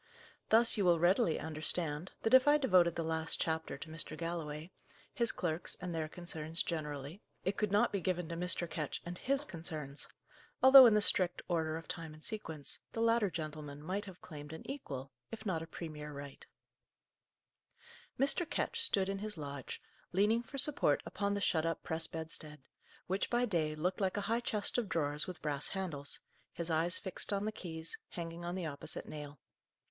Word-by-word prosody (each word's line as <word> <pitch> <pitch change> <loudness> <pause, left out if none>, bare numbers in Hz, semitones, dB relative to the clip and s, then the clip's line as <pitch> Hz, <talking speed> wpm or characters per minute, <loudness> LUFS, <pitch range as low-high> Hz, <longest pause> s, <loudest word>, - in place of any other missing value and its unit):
Thus 230 +1 +5
you 200 - +2
will 175 -1 +5
readily 175 +1 +3
understand, 155 +1 0
that 225 - +1
if 260 +2 +8
I 295 +1 +7
devoted 185 - +4
the 165 - -1
last 160 0 -1
chapter 160 0 -1
to - - -8
Mr. 155 -1 -5
Galloway, 165 -1 -4 0.4
his 235 -1 +3
clerks 170 -1 -2
and 180 -1 -4
their 160 -1 -2
concerns 165 -2 -2
generally, 150 +1 -4 0.2
it 190 +2 0
could 210 -2 0
not 205 +1 +4
be 200 - -1
given 180 -1 -1
to 170 - -3
Mr. 175 0 +2
Ketch 155 -3 -4
and 175 +1 -6
his 275 +2 +2
concerns; 155 - -4 0.6
although 265 -1 +11
in 220 - +5
the 210 - +4
strict 180 -3 +2
order 160 -2 0
of 165 - -9
time 165 -2 -5
and 155 - -15
sequence, 160 - -3
the - - -4
latter 230 -2 +3
gentleman 155 -3 -6
might 195 +5 -2
have 190 -3 -11
claimed 150 -3 -8
an 160 - -9
equal, 135 - -6 0.2
if 225 -1 -8
not 175 -6 0
a 165 - -6
premier 155 -3 -7
right. 140 -1 -9 1.7
Mr. 285 +5 +5
Ketch 465 +5 -1
stood 195 - +3
in 195 0 -2
his 210 -2 -4
lodge, 140 -3 -6 0.3
leaning 210 +5 +3
for 275 +4 -9
support 290 +1 +4
upon 200 0 -1
the 200 - -2
shut 160 -4 +2
up 165 0 -2
press 160 0 0
bedstead, 155 -3 -6 0.4
which, 190 +2 -1
by 240 +1 +2
day, 160 -8 0
looked 180 +6 -1
like 190 +1 +1
a - - 0
high 225 +3 +1
chest 215 0 0
of 220 -5 -3
drawers 150 -3 +1
with 180 -2 -8
brass 145 -2 -1
handles, 165 -8 -3 0.3
his 170 0 -4
eyes 165 +3 +3
fixed 190 - -3
on 200 0 0
the 215 - 0
keys, 165 -5 -6
hanging 170 0 -6
on 175 +1 -3
the 185 -2 -3
opposite 145 -2 -3
nail. 150 -2 -8
170 Hz, 185 wpm, -34 LUFS, 155-200 Hz, 1.7 s, although